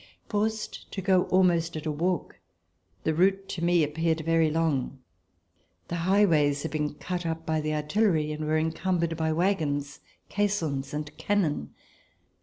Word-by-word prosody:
Forced 215 +1 -2
to - - -3
go 185 -1 +3
almost 170 -3 +2
at 155 - -6
a 155 - 0
walk, 170 +3 -2 0.6
the 160 - +1
route 195 +4 +2
to 170 - -4
me 175 -1 +4
ap 150 0 -2
peared 165 0 0
very 165 0 +3
long. 150 -5 0 0.9
The 170 - -2
highways 155 -8 +3
had 160 - -3
been 150 -1 -2
cut 180 +3 -4
up 165 -1 -3
by 160 -1 0
the 155 0 -1
artillery 155 0 +1
and 155 0 -4
were 155 +1 +2
encumbered 165 +1 0
by 160 0 0
wagons, 155 -5 0 0.3
caissons 160 -10 -1
and 150 0 -5
cannon. 165 - -1
165 Hz, 155 wpm, -27 LUFS, 150-180 Hz, 0.9 s, me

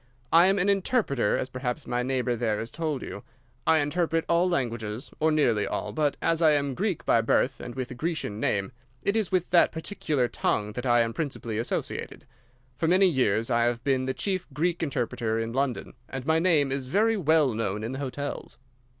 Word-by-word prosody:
I 170 +2 +7
am 195 +1 +3
an 190 +1 +2
interpreter, 195 - +1
as - - -2
perhaps 130 +2 -4
my 125 0 -1
neighbour 125 -1 0
there 110 -2 0
has 115 +3 -5
told 155 -5 -3
you. - - -7 0.5
I 160 - +5
interpret 165 +2 0
all 170 +2 +3
languages—or 120 0 -2
nearly 120 -9 +2
all—but 140 +8 -1
as 165 0 +1
I 155 -2 +6
am 140 -1 +1
a - - -4
Greek 190 - -2
by 115 - +4
birth 115 +3 +1
and 120 - -7
with 130 -2 -4
a - - -4
Grecian 155 -7 -3
name, 100 -1 0 0.3
it 200 - +1
is 220 -5 0
with 180 -2 0
that 175 -1 +5
particular 155 -6 -1
tongue 105 -2 -1
that 125 +4 -4
I 120 -1 +5
am 115 0 -1
principally 120 -8 -3
associated. 115 - -4 0.5
For 165 - +1
many 185 +3 +5
years 125 - +1
I 120 0 +3
have 120 0 -1
been 130 -1 +1
the 130 - -2
chief 190 -3 -2
Greek 170 +5 -1
interpreter 120 -6 -1
in 115 0 -3
London, 135 -1 -2 0.2
and 135 -1 -5
my 160 +1 +3
name 160 -6 +3
is 135 -1 -2
very 215 - +2
well 155 - +3
known 105 -1 -2
in 115 - -3
the 130 - -5
hotels. 140 +1 -5
135 Hz, 200 wpm, -27 LUFS, 120-165 Hz, 0.5 s, I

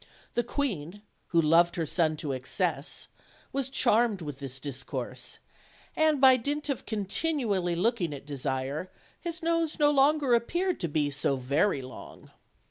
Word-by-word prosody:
The 240 - +1
queen, 205 - -3 0.2
who 170 - +2
loved 165 +2 +4
her 165 - -1
son 155 0 +1
to 150 -2 -3
excess, 140 +4 -1 0.5
was 270 -1 -1
charmed 235 -5 +3
with 145 -3 -6
this 135 -2 -7
dis 135 -1 -6
course, - - -5 0.6
and 315 -2 +3
by 260 -1 +7
dint 290 +4 -2
of 275 - -3
continually 205 - 0
looking 190 -2 +1
at 140 -1 -8
Desire, 140 +3 -3 0.3
his 340 0 -5
nose 330 -1 +1
no 295 -1 +4
longer 285 -1 +4
appeared 345 +11 +1
to 170 - -1
be 150 -2 0
so 140 -1 +1
very 140 +4 +1
long. 130 - -11
185 Hz, 150 wpm, -29 LUFS, -, 0.6 s, by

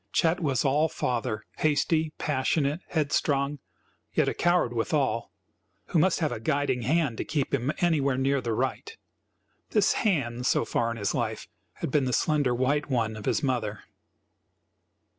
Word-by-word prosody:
Chet 165 +2 +2
was 140 -6 0
all 150 +4 +3
father, 115 -5 -2
hasty, 155 +1 +1
passionate, 145 +1 0
headstrong, 145 -2 0 0.5
yet - - +2
a - - +1
coward 175 -8 +2
withal, 120 0 0 0.6
who 170 - +2
must 180 +2 +2
have 155 - +1
a 120 - -4
guiding 140 0 0
hand 140 -1 +1
to - - 0
keep 145 -4 -2
him 135 +1 +1
anywhere 145 -6 +2
near 135 +1 +1
the 115 -2 -2
right. 130 - -3 0.7
This - - +3
"hand," 130 - 0
so - - +2
far 115 0 0
in 115 - -4
his 100 -3 -1
life, - - -2 0.3
had - - -5
been 140 -1 +2
the 125 - -1
slender 145 -5 +2
white 145 +4 0
one 115 -4 0
of 105 - -8
his - - 0
mother. 120 -6 -1
140 Hz, 160 wpm, -27 LUFS, 120-155 Hz, 0.7 s, all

